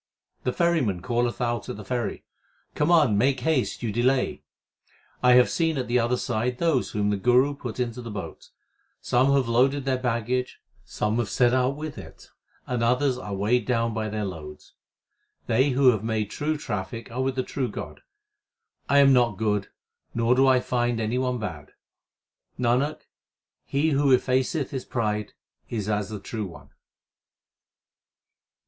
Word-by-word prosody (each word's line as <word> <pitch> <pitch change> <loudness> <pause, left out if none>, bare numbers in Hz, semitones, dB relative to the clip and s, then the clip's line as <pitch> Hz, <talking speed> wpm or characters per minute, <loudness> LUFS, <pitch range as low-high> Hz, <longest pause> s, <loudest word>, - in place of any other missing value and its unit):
The 125 - +2
ferryman 130 - +1
calleth 120 +1 -1
out 120 -2 -2
at - - -5
the 105 - -9
ferry, 120 -2 -3 0.5
Come 150 - 0
on, 145 -12 +4
make 130 +1 +2
haste; 135 -3 0
you 115 - -1
delay. 125 +4 +1 0.8
1 125 0 +5
have 125 0 +6
seen 165 -3 0
at 130 - -2
the 120 +1 +2
other 120 +2 +1
side 120 +1 -2
those 160 -5 +1
whom 105 -1 0
the 100 - 0
Guru 125 +7 +3
put 125 -4 -7
into 125 0 -2
the 120 - -7
boat. 105 -3 -7 0.5
Some 130 +3 +2
have 135 -3 +2
loaded 130 +4 +2
their 130 -1 0
baggage, 125 +1 -1 0.2
some 105 +2 -2
have 115 -4 -1
set 120 +4 +3
out 130 +1 +2
with 155 0 -6
it, - - -13 0.3
and 125 -2 -2
others 125 +3 +2
are 105 -5 -5
weighed 110 +4 +1
down 115 -2 +1
by 110 -1 -2
their 105 0 -3
loads. 80 -5 -9 0.7
They 130 +5 +2
who 130 0 +5
have 110 -3 -3
made 110 -2 -2
true 155 +1 -1
traffic 105 -3 -5
are 125 +3 -2
with 130 0 -1
the 130 - 0
true 130 -1 -2
God. - - -8 0.9
I 140 - +4
am 140 -1 +7
not 120 -5 +3
good, 105 -2 0 0.5
nor 115 +1 +3
do 135 +1 +4
I 130 -1 +4
find 120 -2 0
any 115 +3 -1
one 125 -1 0
bad. 80 -10 -7 0.8
Nanak, 125 +5 +1 0.6
he 150 +3 +1
who 140 -1 +3
effaceth 130 +4 -1
his 130 -2 -4
pride 105 -3 -2 0.4
is 105 -4 -3
as 105 -1 -1
the 105 -1 -5
True 105 +1 -5
One. 85 - -14
125 Hz, 165 wpm, -25 LUFS, 110-130 Hz, 0.9 s, am